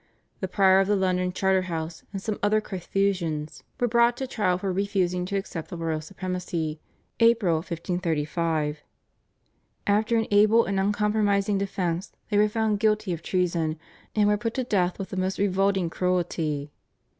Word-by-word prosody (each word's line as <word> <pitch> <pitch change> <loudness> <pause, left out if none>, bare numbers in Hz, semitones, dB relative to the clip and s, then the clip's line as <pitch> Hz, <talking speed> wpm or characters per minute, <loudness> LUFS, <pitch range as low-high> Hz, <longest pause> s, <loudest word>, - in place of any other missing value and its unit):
The 190 - -2
Prior 190 0 +4
of 195 - +2
the 205 - +3
London 185 -1 +1
Charterhouse 180 -4 -1
and 195 - -4
some 210 +1 -3
other 210 +1 +3
Carthusians 180 -6 -2 0.2
were 245 - +2
brought 235 +1 +3
to 265 - -2
trial 210 -8 0
for 190 0 -2
refusing 185 -2 0
to 200 - -3
accept 170 -4 -5
the 175 - -6
royal 160 -2 -2
supremacy 175 -3 -4 0.4
(April, 230 -8 +4
1535). 165 -2 -2 1.1
After 215 +3 +2
an 225 - +1
able 215 +3 +5
and 195 0 -1
uncompromising 205 0 +1
defence 185 -2 -2 0.2
they 205 - +3
were 210 0 +4
found 215 -1 0
guilty 215 -3 +1
of 165 - -5
treason 170 -3 0 0.4
and 210 -1 +4
were 210 0 +3
put 230 +2 -3
to 260 - 0
death 185 -6 0
with 195 - -5
the 190 - -4
most 185 +1 -1
revolting 195 -2 +1
cruelty. 165 -5 -1
190 Hz, 155 wpm, -26 LUFS, 170-205 Hz, 1.1 s, able